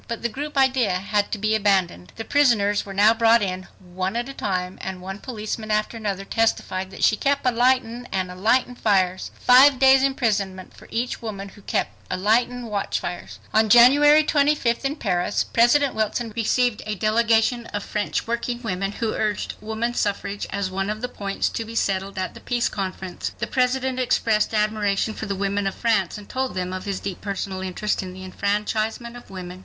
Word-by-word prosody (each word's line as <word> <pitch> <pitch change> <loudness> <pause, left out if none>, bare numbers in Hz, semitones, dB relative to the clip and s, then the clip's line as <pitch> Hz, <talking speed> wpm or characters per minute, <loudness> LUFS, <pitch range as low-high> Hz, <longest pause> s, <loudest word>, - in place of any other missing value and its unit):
But 235 -1 -5
the 235 - +1
group 290 +5 -6
idea 260 -7 +3
had 205 +2 -1
to - - -1
be 215 +1 0
abandoned. 190 - +1
The 225 - -6
prisoners 215 -9 +2
were 195 - -6
now 210 +3 +6
brought 230 -1 +4
in 185 -1 -4
one 185 +2 -4
at 240 +1 -2
a 275 - -7
time, 185 -5 -3
and 190 -1 -5
one 190 +2 -7
policeman 215 -2 -5
after 215 +2 0
another 200 -3 -3
testified 190 -4 -1
that, 190 - -7
"she 215 - +5
kep' 280 +4 0
alightin' 245 -1 +1
and 185 -1 -2
alightin' 230 +7 +1
fires." 190 -5 +1
Five 265 +2 +7
days' 265 +1 +6
imprisonment 205 -8 -1
for - - -15
each 240 +2 -3
woman 200 -3 -6
who 205 - -16
"kep' - - -1 0.2
alightin'" 230 +6 +1
watchfires! 200 -5 -4 0.2
On 220 0 +3
January 290 +7 +7
25th, 285 -5 +1
in 275 +2 0
Paris, 185 - 0
President 260 +4 +3
Wilson 220 +1 -2
received 235 0 +1
a 215 - -2
delegation 225 +3 +2
of 205 0 -4
French 210 -1 -2
working 235 +1 -3
women 195 -2 -2
who 225 -1 -2
urged 210 -2 -2
woman 220 +2 -2
suffrage 205 -2 -2
as 200 -2 -3
one 195 +1 -2
of 215 +1 -4
the 250 - -2
points 200 -4 -2
to 230 - -4
be 225 +1 -9
settled 195 -2 -1
at 185 0 -3
the - - -11
Peace 240 -1 0
Conf6rence. 190 -2 -5
The - - -2
President 255 0 0
expressed 225 -4 +1
admiration 210 0 0
for 220 - -6
the 200 - -2
women 200 +1 -1
of 195 - -3
France, 215 -6 0
and 205 -1 -11
told 260 -3 -3
them 185 0 -3
of 185 +1 -5
his 195 -2 -3
deep 195 -3 -6
personal 195 -1 -4
interest 190 +3 -2
in 185 -1 -7
the 185 0 -9
enfranchisement 215 +4 -2
of 245 - -12
women. 185 -1 -8
215 Hz, 190 wpm, -23 LUFS, 195-240 Hz, 0.2 s, Five